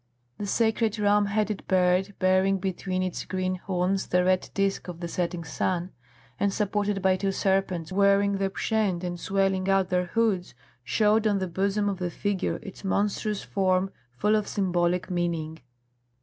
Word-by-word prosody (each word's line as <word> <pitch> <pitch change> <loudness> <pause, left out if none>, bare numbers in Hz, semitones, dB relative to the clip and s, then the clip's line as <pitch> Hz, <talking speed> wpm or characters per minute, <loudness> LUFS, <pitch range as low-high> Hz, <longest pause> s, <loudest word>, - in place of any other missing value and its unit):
The 205 - -3
sacred 225 0 +1
ram 205 0 +3
headed 210 0 -1
bird, 185 +1 +2
bearing 185 +1 +3
between 185 0 -2
its 185 -2 -3
green 185 0 -2
horns 185 +1 -1
the 180 0 +2
red 185 0 +1
disc 195 -1 0
of 175 -2 -7
the 170 - -4
setting 170 0 -2
sun 175 +3 -2 0.5
and 200 - +2
supported 205 -1 -1
by 190 0 +3
two 195 0 0
serpents 190 -3 0
wearing 200 +1 +3
the 195 0 +1
pschent 195 -3 -1
and 175 -1 -4
swelling 195 0 0
out 195 -1 +3
their 180 -1 +1
hoods, 205 -3 0 0.3
showed 215 - +2
on 205 -2 +2
the 190 -1 -2
bosom 200 +3 0
of 195 -2 -2
the 180 -1 -1
figure 200 +2 -1
its 195 -2 -10
monstrous 205 +1 -1
form 190 -1 +1 0.2
full 210 - +2
of 210 -1 0
symbolic 180 -1 0
meaning. 165 -2 -2
190 Hz, 165 wpm, -26 LUFS, 180-200 Hz, 0.5 s, ram